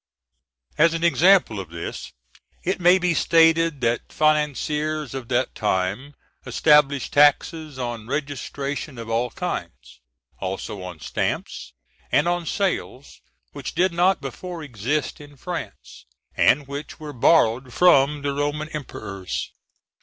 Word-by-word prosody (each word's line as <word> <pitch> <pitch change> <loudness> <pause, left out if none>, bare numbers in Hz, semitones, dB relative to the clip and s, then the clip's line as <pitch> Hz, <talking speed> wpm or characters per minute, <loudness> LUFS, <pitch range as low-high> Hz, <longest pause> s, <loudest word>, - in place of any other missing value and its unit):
As 165 +1 +5
an 165 - -3
example 170 - +4
of 95 -4 -7
this, 85 0 -7 0.5
it 185 +2 -1
may 180 +1 +6
be 180 -2 +1
stated 165 -2 +3
that 115 -1 -1
financiers 150 -1 0
of 130 -3 -6
that 125 +1 0
time 105 +7 -2 0.3
established 140 +1 +3
taxes 150 +1 +3
on 120 -3 -5
registration 140 0 -4
of 115 -1 -7
all 120 +2 0
kinds, 60 - -6 0.4
also 95 +2 -5
on 90 -3 -8
stamps, - - -3 0.4
and 145 +6 +3
on 175 -1 -1
sales, 185 -8 -3 0.3
which - - -7
did 185 -1 +2
not 180 +2 +2
before 160 +7 -7
exist 145 +4 -3
in 145 -1 -14
France, 175 +4 -8 0.3
and 135 +6 +3
which 140 +3 -7
were 150 -1 -7
borrowed 125 -2 +3
from 145 -3 +4
the 140 -1 -1
Roman 145 +2 -2
emperors. 100 -11 -6
145 Hz, 125 wpm, -23 LUFS, 120-160 Hz, 0.5 s, may